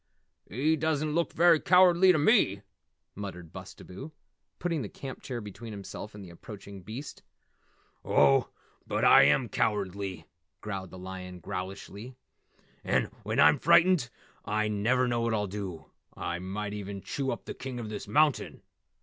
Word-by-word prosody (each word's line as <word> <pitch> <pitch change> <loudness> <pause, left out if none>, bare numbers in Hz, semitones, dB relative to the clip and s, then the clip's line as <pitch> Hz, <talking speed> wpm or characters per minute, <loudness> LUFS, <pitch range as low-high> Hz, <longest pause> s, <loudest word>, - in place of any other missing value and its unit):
"He 145 +9 +1
doesn't 155 -1 -1
look 170 +1 0
very 170 -1 +5
cowardly 180 +1 +6
to 175 - +2
me," 145 - +3 0.5
muttered 90 -5 -8
Bustabo, 130 +12 -10 0.5
putting 170 -4 -1
the 105 - -5
camp 135 +5 -8
chair 120 -3 -5
between 110 +2 -9
himself 100 +1 -8
and 100 -2 -9
the 85 - -12
approaching 100 +2 -10
beast. 115 +10 -8 0.8
"Oh, 135 -3 +4 0.4
but - - 0
I - - +8
am 95 - +3
cowardly," 100 -3 -2 0.3
growled 95 -3 -5
the 95 - -11
lion 90 0 -8
growlishly, 100 +6 -7 0.7
"and - - +1
when - - -2
I'm - - +6
frightened 170 -8 +4 0.3
I 110 +1 0
never 115 +5 +1
know 120 -1 0
what 115 -1 0
I'll 105 -1 0
do. 95 -5 -7 0.3
I 85 0 -3
might 100 +3 -4
even 100 -1 -6
chew 135 +5 -3
up - - -4
the - - -5
King 130 -2 -6
of 110 -2 -5
this 105 -1 -6
Mountain! 150 -1 +1
105 Hz, 150 wpm, -29 LUFS, 95-140 Hz, 0.8 s, I